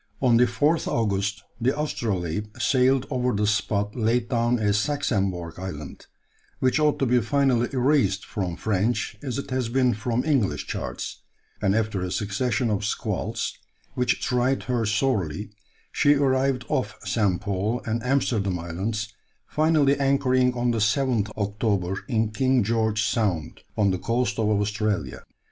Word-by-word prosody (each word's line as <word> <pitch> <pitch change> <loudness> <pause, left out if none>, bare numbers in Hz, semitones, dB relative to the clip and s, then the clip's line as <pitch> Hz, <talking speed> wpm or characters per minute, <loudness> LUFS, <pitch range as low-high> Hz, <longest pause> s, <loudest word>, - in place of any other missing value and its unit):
On 120 -3 +4
the 125 - +6
4th 150 +7 +1
August 105 -2 -1 0.2
the 130 +5 +1
Astrolabe 105 - -2
sailed 130 0 +3
over 125 -1 0
the 105 +1 +1
spot 105 0 0
laid 120 0 +1
down 120 0 +2
as 105 -2 +1
"Saxembourg" 100 - -1
Island, 75 -6 -7 0.5
which 130 +3 +2
ought 150 -1 +3
to 135 - +1
be 125 0 +3
finally 125 0 +2
erased 130 -7 +2
from 90 -4 -3
French 110 +2 -1
as 130 -4 -4
it 140 - -5
has 130 -3 -1
been 125 0 +2
from 115 +3 -1
English 135 -10 +1
charts; - - -5 0.4
and 100 -1 +2
after 110 -3 0
a 90 - -2
succession 110 +5 -1
of 105 -1 -1
squalls, 105 - -2 0.4
which 125 0 +1
tried 125 +1 0
her 120 -4 -1
sorely, 105 - 0 0.4
she 145 0 +4
arrived 135 -2 +1
off - - -1
St. 100 -6 +1
Paul 100 +5 -1
and 115 +1 -1
Amsterdam 115 -7 0
Islands, 105 +6 -4 0.3
finally 150 -3 +2
anchoring 130 -2 +2
on 120 0 +1
the 115 - -1
7th 110 0 +1
October 100 -3 -1
in 110 -4 +1
King 130 +1 +2
George's 110 0 +1
Sound, 95 -9 -1 0.2
on 100 -2 +3
the 95 - -2
coast 120 -1 -1
of 110 - +2
Australia. 105 -1 -1
115 Hz, 150 wpm, -25 LUFS, 100-130 Hz, 0.5 s, the